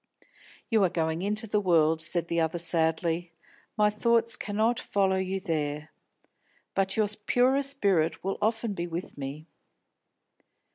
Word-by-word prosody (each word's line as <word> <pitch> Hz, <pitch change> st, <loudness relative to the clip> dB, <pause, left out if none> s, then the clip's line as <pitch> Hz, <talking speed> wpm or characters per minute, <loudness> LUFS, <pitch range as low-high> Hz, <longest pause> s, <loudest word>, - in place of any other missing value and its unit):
"You 220 Hz, -3 st, +4 dB
are 185 Hz, -, +3 dB
going 160 Hz, 0 st, -1 dB
into 210 Hz, +3 st, -1 dB
the 210 Hz, -1 st, 0 dB
world," 160 Hz, -4 st, +3 dB
said 170 Hz, +2 st, 0 dB
the 170 Hz, 0 st, 0 dB
other 160 Hz, +1 st, 0 dB
sadly, 165 Hz, 0 st, 0 dB, 0.4 s
"my 210 Hz, 0 st, +4 dB
thoughts 230 Hz, +2 st, +2 dB
cannot 220 Hz, +4 st, 0 dB
follow 195 Hz, -1 st, +1 dB
you 190 Hz, +1 st, -2 dB
there. 150 Hz, -4 st, -3 dB, 0.8 s
But 195 Hz, +1 st, 0 dB
your 215 Hz, -1 st, +3 dB, 0.2 s
purer 260 Hz, +3 st, +3 dB
spirit 200 Hz, -, +1 dB
will 195 Hz, +1 st, -2 dB
often 225 Hz, 0 st, 0 dB
be 175 Hz, -2 st, -4 dB
with 170 Hz, +1 st, -6 dB
me." 140 Hz, +3 st, -6 dB
190 Hz, 140 wpm, -28 LUFS, 165-210 Hz, 0.8 s, You